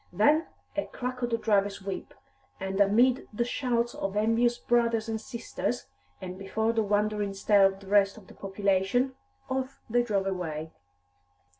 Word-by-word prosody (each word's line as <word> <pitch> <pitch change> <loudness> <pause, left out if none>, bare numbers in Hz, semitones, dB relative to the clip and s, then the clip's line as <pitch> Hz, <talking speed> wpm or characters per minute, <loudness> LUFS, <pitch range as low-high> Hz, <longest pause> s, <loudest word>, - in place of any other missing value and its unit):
Then 290 - +3 0.3
a 300 - -1
crack 255 0 -5
of 240 - 0
the 230 - +1
driver's 205 -3 +1
whip, 195 -1 -6 0.4
and 195 +1 -1
amid 240 +6 +4
the 235 +3 -1
shouts 240 -2 0
of 195 +1 -3
envious 230 +3 +3
brothers 235 -2 +1
and 220 -1 -2
sisters, 235 +1 -4 0.3
and 185 0 -7
before 220 +4 0
the 225 - +2
wondering 210 -1 0
stare 195 0 +5
of 195 0 -5
the - - -12
rest 200 0 +4
of 210 - -13
the - - -14
population, 200 +6 0 0.3
off 265 +1 -3
they 240 +1 +4
drove 205 -5 0
away. 160 -5 -3
215 Hz, 160 wpm, -28 LUFS, 195-240 Hz, 0.4 s, stare